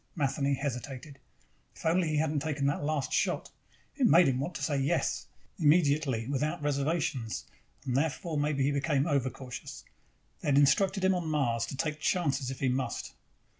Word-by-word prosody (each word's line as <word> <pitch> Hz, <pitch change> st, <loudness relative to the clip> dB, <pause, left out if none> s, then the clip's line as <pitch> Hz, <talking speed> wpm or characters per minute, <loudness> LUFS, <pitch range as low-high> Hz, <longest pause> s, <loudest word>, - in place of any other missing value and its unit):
Matheny 140 Hz, -2 st, +1 dB
hesitated. 135 Hz, +1 st, -5 dB, 0.6 s
If -, -, -12 dB
only 170 Hz, +1 st, +3 dB
he 155 Hz, -1 st, 0 dB
hadn't 155 Hz, -1 st, +1 dB
taken 145 Hz, -2 st, -2 dB
that 140 Hz, +1 st, 0 dB
last 145 Hz, -2 st, -1 dB
shot! -, -, 0 dB, 0.4 s
It 265 Hz, -4 st, +3 dB
made 175 Hz, -3 st, +6 dB
him 130 Hz, -1 st, +1 dB
want 165 Hz, +6 st, -3 dB
to -, -, -4 dB
say 145 Hz, -3 st, 0 dB
yes, 135 Hz, +1 st, 0 dB, 0.3 s
immediately, 145 Hz, -6 st, +3 dB
without 145 Hz, +2 st, -1 dB
reservations. 140 Hz, -5 st, -1 dB, 0.4 s
And 125 Hz, -, -1 dB
therefore 155 Hz, +3 st, -1 dB
maybe 145 Hz, -2 st, +1 dB
he 140 Hz, -, +2 dB
became 140 Hz, 0 st, +1 dB
overcautious. 135 Hz, -1 st, -3 dB, 0.5 s
They -, -, -6 dB
had 140 Hz, -1 st, +4 dB
instructed 190 Hz, +7 st, +3 dB
him 190 Hz, -, +4 dB
on 175 Hz, -3 st, -2 dB
Mars 120 Hz, -7 st, 0 dB
to 135 Hz, -, -6 dB
take 155 Hz, +2 st, -2 dB
chances 140 Hz, -6 st, 0 dB
if 130 Hz, -, -7 dB
he 135 Hz, -, +2 dB
must. 130 Hz, +1 st, -2 dB
145 Hz, 170 wpm, -30 LUFS, 135-155 Hz, 0.6 s, made